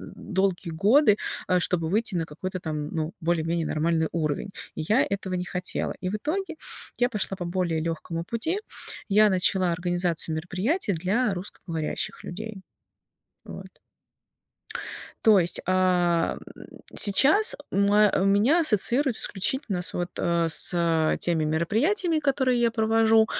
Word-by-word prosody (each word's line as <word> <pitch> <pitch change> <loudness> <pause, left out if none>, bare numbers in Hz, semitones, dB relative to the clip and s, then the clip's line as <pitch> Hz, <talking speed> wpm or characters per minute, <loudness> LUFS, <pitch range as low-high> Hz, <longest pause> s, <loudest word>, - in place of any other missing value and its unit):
долгие 190 -3 -2
годы, 210 - +4 0.3
э, 180 0 +2
чтобы 165 -2 0
выйти 215 0 0
на 165 - -1
какой-то 185 +4 -6
там, 150 -3 -5
ну, 160 0 -4
более-менее 165 0 -1
нормальный 160 +1 0
уровень. 155 +3 -2 0.3
И - - -4
я 230 +6 +3
этого 190 -2 -3
не 180 0 -3
хотела. 180 0 -3
И 185 - -2
в 210 - -3
итоге 330 - -3 0.4
я 245 0 +2
пошла 205 -4 -3
по 175 - -5
более 170 -3 -1
лёгкому 165 0 -4
пути. 315 - -2 0.5
Я 210 +1 +5
начала 185 -1 +1
организацию 175 -2 -1
мероприятий 195 - -2
для 200 +7 0
русскоговорящих 170 -4 -5
людей. 215 +2 -8 0.8
Вот. - - -9 1.6
То 215 -3 +6
есть, 175 -1 +1
а, 180 -2 +1 0.2
м, - - -13 0.3
сейчас 285 - +6
моа 205 +1 +3
меня 210 - +3
ассоциируют 250 - +3
исключительно 200 0 -2
с, - - -2
вот, 175 0 -3
э, 170 -1 0
с 165 -2 +3
теми 165 -3 0
мероприятиями, 275 - 0
которые 265 -4 +1
я 235 -1 +2
провожу, 225 0 +3
185 Hz, 135 wpm, -25 LUFS, 170-220 Hz, 1.6 s, То